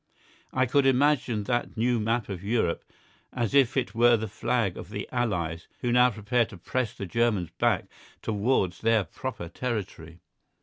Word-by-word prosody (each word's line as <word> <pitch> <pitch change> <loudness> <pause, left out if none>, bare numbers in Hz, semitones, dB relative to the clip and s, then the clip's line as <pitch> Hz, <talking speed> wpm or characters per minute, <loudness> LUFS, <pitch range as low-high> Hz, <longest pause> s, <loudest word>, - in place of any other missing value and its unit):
I 130 0 +2
could 135 +2 +3
imagine 130 -5 +2
that 120 +2 -2
new 120 +1 +2
map 115 +1 0
of 95 -2 -6
Europe 105 -5 0 0.5
as 120 -4 -2
if 135 -2 +4
it 115 -7 0
were 120 +1 +5
the 110 0 -3
flag 115 -2 -1
of 90 - -8
the 105 -1 -5
allies 90 -9 -2
who 120 - 0
now 125 +1 +6
prepare 115 +2 +1
to 100 - -11
press 125 +4 -2
the 100 - -5
Germans 105 -4 0
back - - +2 0.4
towards 105 -3 0
their 115 -2 +3
proper 115 -4 -6
territory. 90 -8 -5
115 Hz, 165 wpm, -27 LUFS, 100-125 Hz, 0.5 s, now